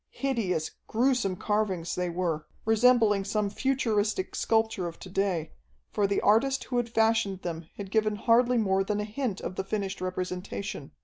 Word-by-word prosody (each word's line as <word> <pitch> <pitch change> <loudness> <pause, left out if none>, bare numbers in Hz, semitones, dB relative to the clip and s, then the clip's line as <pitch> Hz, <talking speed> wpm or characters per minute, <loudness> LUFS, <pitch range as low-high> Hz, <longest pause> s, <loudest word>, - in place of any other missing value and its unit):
Hideous, 210 - -1 0.2
gruesome 235 -5 +1
carvings 195 -4 -1
they 180 -1 -1
were, 170 -3 -2 0.2
resembling 225 -2 +4
some 205 0 -1
futuristic 235 - 0
sculpture 220 -5 +1
of 170 - -7
to 185 - -10
day, 190 -4 0 0.4
for 205 -1 +1
the 200 - 0
artist 265 +6 +3
who 250 - -3
had 240 -1 0
fashioned 220 -4 +1
them 165 -2 -5
had 195 -2 -7
given 215 -1 +2
hardly 240 +3 +3
more 195 -3 +2
than 205 +2 -1
a - - -1
hint 215 -1 -3
of 185 - -5
the - - -1
finished 195 -1 -3
representation. 185 -3 -4
205 Hz, 165 wpm, -28 LUFS, 185-225 Hz, 0.4 s, resembling